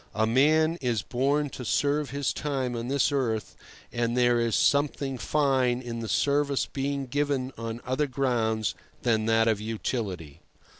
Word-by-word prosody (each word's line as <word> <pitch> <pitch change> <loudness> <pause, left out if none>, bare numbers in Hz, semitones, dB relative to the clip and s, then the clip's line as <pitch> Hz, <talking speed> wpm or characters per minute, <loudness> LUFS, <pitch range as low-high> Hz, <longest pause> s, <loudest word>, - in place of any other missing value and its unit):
A 110 +1 +2
man 155 +8 +3
is 120 -6 0
born 140 +3 0
to 125 - -7
serve 145 +4 +1
his 140 0 -1
time 135 -4 -2
on 115 +1 -4
this 140 +2 +2
earth, 115 -6 -1 0.4
and 120 0 0
there 120 -1 +4
is 115 -1 +1
something 140 -2 +1
fine 130 -1 +1
in 120 -2 -6
the 115 -1 -5
service 140 -1 +1
being 140 0 -3
given 135 -1 -1
on 115 +1 -5
other 130 +4 0
grounds 115 -5 0 0.3
than 110 -2 +1
that 115 0 +3
of 110 -2 +1
utility. 105 - -4
125 Hz, 155 wpm, -27 LUFS, 115-140 Hz, 0.4 s, there